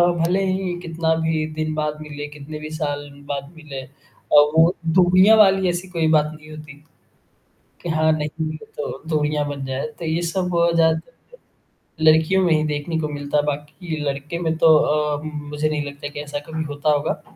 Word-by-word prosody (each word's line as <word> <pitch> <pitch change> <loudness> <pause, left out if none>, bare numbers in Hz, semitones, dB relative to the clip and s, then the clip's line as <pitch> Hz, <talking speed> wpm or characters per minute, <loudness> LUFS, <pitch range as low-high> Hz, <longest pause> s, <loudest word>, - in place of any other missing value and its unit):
भले 175 +2 +2
ही 185 -1 -1
कितना 165 -1 0
भी 155 -1 0
दिन 155 0 -2
बाद 150 0 -2
मिले, 145 -1 -6
कितने 150 +1 -9
भी 155 0 -7
साल 145 -2 -3 0.2
बाद 140 0 -4
मिले 150 -4 -8
अ, 130 - -13 0.5
वो 160 +4 +6 0.2
दूरियाँ 185 +4 +6
वाली 195 -2 +5
ऐसी 175 +2 -4
कोई 165 -3 0
बात 150 -1 +3
नहीं 155 0 -14
होती 150 -2 -11 1.0
कि 175 - -5
हाँ, 155 0 +3
नहीं 155 +1 -2
है 155 - -6 0.2
तो 145 -1 -5
दूरियाँ 150 -1 0
बन 140 -1 -5
जाए 130 +8 -3
तो 170 - -5
ये 160 +1 0
सब 180 +2 -1 0.3
ज़्यादातर 160 +4 +2 1.0
लड़कियों 160 +4 +5
में 170 - +3
ही 155 0 +2
देखने 150 +2 -2
को 155 - -1
मिलता 145 0 -2
है 145 - +3
बाकी 150 +3 -4
लड़के 140 +4 -3
में 165 -2 0
तो 160 -1 +6
अ, 150 -1 +1
मुझे 150 0 -3
नहीं 150 -1 -1
लगता 145 0 -7
कि 145 - -8
ऐसा 145 0 -5
कभी 160 0 -3
होता 145 +1 0
होगा। 145 -1 0
155 Hz, 185 wpm, -22 LUFS, 145-165 Hz, 1.0 s, वो